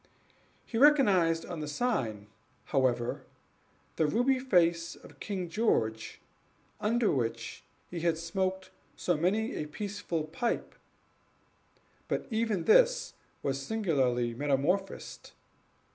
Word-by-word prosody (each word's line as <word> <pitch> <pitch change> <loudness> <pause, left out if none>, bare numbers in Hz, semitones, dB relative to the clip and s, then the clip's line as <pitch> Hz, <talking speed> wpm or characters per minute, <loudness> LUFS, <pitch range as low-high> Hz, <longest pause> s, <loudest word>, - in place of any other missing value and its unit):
He 225 - -3
recognized 200 - +5
on 175 -3 -6
the 150 - -4
sign, 145 - -1 0.4
however, 125 -3 0 0.8
the 160 - +3
ruby 245 - +2
face 170 -8 +2
of - - -16
King 190 -4 -3
George, 115 - 0 0.6
under 220 +1 +2
which 115 -3 -3 0.3
he 175 - -4
had 165 -1 +1
smoked 185 +2 -2 0.2
so 175 - 0
many 200 +8 0
a 150 - -4
peaceful 200 -1 -4
pipe; 230 +10 -2 1.3
but - - -2
even 220 -5 0
this - - +4 0.3
was 135 0 -1
singularly 135 - 0
metamorphosed. 145 +9 -1
175 Hz, 105 wpm, -30 LUFS, 145-215 Hz, 1.3 s, recognized